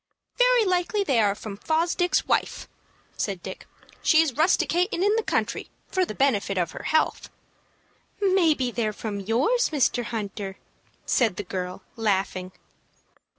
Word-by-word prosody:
"Very - - +5
likely 370 +3 +1
they 270 -10 +2
are 205 -2 +3
from 210 -1 -8
Fosdick's 335 - +1
wife," - - 0 0.5
said 195 -4 -3
Dick. 190 - -8 0.3
"She's 320 -2 +4
rusticatin' 350 - +1
in 415 +2 +3
the 450 - +2
country - - -2 0.2
for 375 -1 +1
the 215 - -7
benefit 210 -8 +1
of 175 -3 0
her - - -9
health." 315 0 +1 0.9
"Maybe 335 -10 +2
they're 220 -3 -1
from 205 -1 -5
yours, 255 - +1
Mr. 255 -5 +1
Hunter," 205 -3 -5 0.5
said 225 -7 +2
the 205 - -4
girl, 180 0 -5
laughing. 195 -4 -1
245 Hz, 135 wpm, -25 LUFS, -, 0.9 s, Very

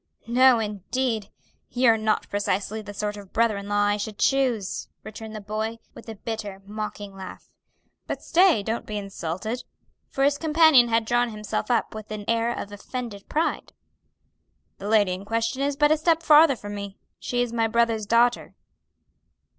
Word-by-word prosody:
"No, 250 +1 +5
indeed; 220 +1 -2 0.4
you're 245 -2 +4
not 215 -1 0
precisely 205 +1 -2
the 205 -1 -9
sort 210 0 -3
of 200 -2 -12
brother 230 -1 +2
in 200 0 -6
law 205 0 +2
I 205 0 +2
should 210 0 -5
choose," 250 -8 0 0.2
returned 220 0 -8
the 215 - -6
boy, 215 +2 -3 0.2
with - - -12
a 220 - -6
bitter, 210 -2 -6
mocking 205 -1 -6
laugh. 190 -1 -10 0.6
"But - - -4
stay, 340 - +4
don't 225 +3 -3
be 215 - -4
insulted" 195 +3 -4 0.5
for 270 - -1
his 285 +1 +2
companion 315 -5 +5
had 230 -1 +1
drawn 240 +1 +1
himself 210 +1 -4
up 240 -2 +1
with 215 -1 -8
an 210 -1 -6
air 230 +1 +1
of 205 - -5
offended 205 0 -7
pride 320 +2 -1 1.1
"the 200 - -6
lady 210 -4 +4
in 185 +2 -6
question 230 +5 -1
is 280 0 0
but 295 +1 +4
a 310 - +4
step 330 +1 +2
farther 300 -2 +7
from 205 -2 -8
me; 200 -1 -7 0.2
she 245 0 -1
is 240 -1 -5
my 225 -1 +2
brother's 225 -1 +1
daughter." 235 +2 +2
220 Hz, 170 wpm, -25 LUFS, 205-245 Hz, 1.1 s, farther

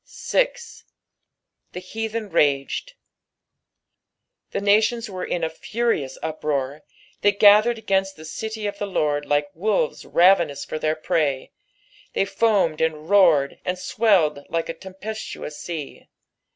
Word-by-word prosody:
fl. - - -2 0.7
" - - -54
The - - -5
heathen 220 +2 -5
mged." 145 - +1 1.6
The - - -3
nations 215 +3 +2
were 185 -1 -5
in 175 - -2
a - - +2
furious 185 - -2
uproar, 150 -3 -2 0.4
they 205 - +5
gathered 210 +3 +5
against 195 -3 0
the 155 - -12
city 220 +6 -5
of 200 0 -4
the 205 - -2
I^ord 145 -6 0
like 145 0 0
wolves 195 -2 -1
ravenous 170 -5 +3
for 155 - -5
their 155 0 0
prey; 150 -3 -1 0.6
they - - +1
foamed, 200 -7 +1
and 160 +1 -1
roared, 165 -9 +4
and 180 0 -2
swelled 185 -7 +2
like 165 -1 -2
a - - -2
tempiestuous 190 -3 -7
sea. 160 -5 -7
180 Hz, 130 wpm, -23 LUFS, 155-205 Hz, 1.6 s, they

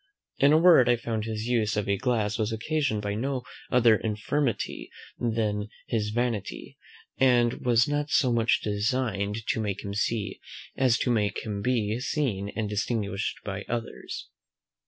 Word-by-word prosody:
In 140 +1 +6
a 155 - +6
word, 160 -7 +6
I 120 - +5
found 115 -2 -3
his 110 -1 -3
use 110 -3 +1
of 105 - -1
a 100 - +2
glass 110 -2 0
was 110 0 0
occasioned 115 -1 -1
by 100 0 -1
no 130 +4 -2 0.3
other 120 -3 +5
infirmity 110 - -2 0.3
than 110 -3 -1 0.2
his 105 -2 -1
vanity, 115 -2 -3 0.4
and 120 -2 +3
was 120 -1 +4
not 145 0 -1
so 130 -5 +3
much 115 -1 +2
designed 105 -1 -1
to - - 0
make 100 -2 -3
him 100 - -4
see, 105 -1 -1 0.4
as 125 -3 +3
to 125 - 0
make 105 -3 0
him 105 -2 -3
be 115 -1 0
seen 125 -8 -1
and 110 0 -1
distinguished 105 -1 -2
by 100 0 -4
others. 115 -1 -5
115 Hz, 155 wpm, -27 LUFS, 105-125 Hz, 0.4 s, In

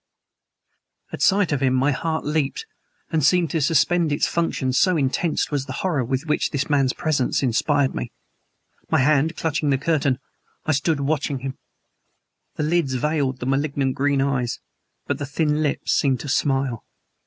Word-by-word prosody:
At - - -5
sight 195 -4 +3
of 145 -2 0
him 130 -1 +2
my 135 +3 +2
heart 160 +3 -2
leaped 150 - -1 0.5
and 160 -3 +1
seemed 170 +1 +3
to 165 - 0
suspend 160 +3 +2
its 145 - +1
functions, 135 -6 0
so 185 -2 +3
intense 150 +5 0
was 140 -2 -1
the 130 - -5
horror 155 -8 +1
which 135 +5 -1
this 140 -2 -2
man's 135 -3 +3
presence 145 -4 0
inspired 135 +3 +2
in - - -7
me. - - -4 0.8
My - - +3
hand 150 +4 +2
clutching 155 -2 -1
the 135 - +3
curtain, 140 -3 +1 0.5
I 155 - +1
stood 145 +1 +1
watching 140 -2 -1
him. 135 0 -4 1.0
The 155 - -2
lids 155 -4 +1
veiled 135 -1 -1
the - - -3
malignant 135 0 0
green 140 0 +1
eyes, 125 -4 -1 0.5
but - - -2
the 145 - -4
thin 150 +1 0
lips 145 -2 -1
seemed 135 -3 +2
to - - -7
smile. 135 -4 0
145 Hz, 165 wpm, -22 LUFS, 135-155 Hz, 1.0 s, sight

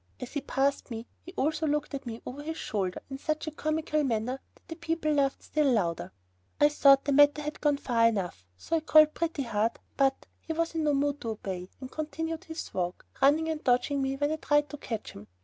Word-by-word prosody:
As 250 - -7
he 285 - -1
passed 275 +1 0
me, 230 -1 -5 0.2
he 360 - -11
also 315 -1 0
looked 295 0 -1
at 275 -2 -5
me 230 0 -6
over 275 +3 -6
his 320 +2 -5
shoulder 190 -4 -2
in 270 - -5
such 310 +2 -2
a 310 - -4
comical 310 0 -1
manner 250 +1 -1 0.2
that - - -27
the 325 - -6
people 325 -1 -1
laughed 275 -2 +1
still 300 -3 +2
louder. 175 -8 0 0.5
I 295 - +6
thought 275 -2 +5
the 285 - +1
matter 290 +1 +5
had 300 +1 -5
gone 295 -1 +3
far 230 -4 +3
enough, 180 - -2
so 330 - -1
I - - +1
called 310 0 +6
Pretty 325 -4 -1
Heart, 225 -1 0 0.2
but 270 -1 +2
he 325 - -5
was 330 +1 -1
in 320 -2 -1
no 295 -1 +3
mood 285 +1 0
to 230 - -3
obey, 190 -4 -5
and 260 -1 -8
continued 325 +3 -4
his 325 -1 -7
walk, 180 -1 -3 0.2
running 300 +4 +4
and 315 -1 -3
dodging 255 +3 +2
me 270 0 0
when 290 +2 0
I 315 - -1
tried 295 -1 +2
to 295 - -6
catch 225 -6 -5
him. 105 +1 -12
285 Hz, 225 wpm, -29 LUFS, 245-310 Hz, 0.5 s, I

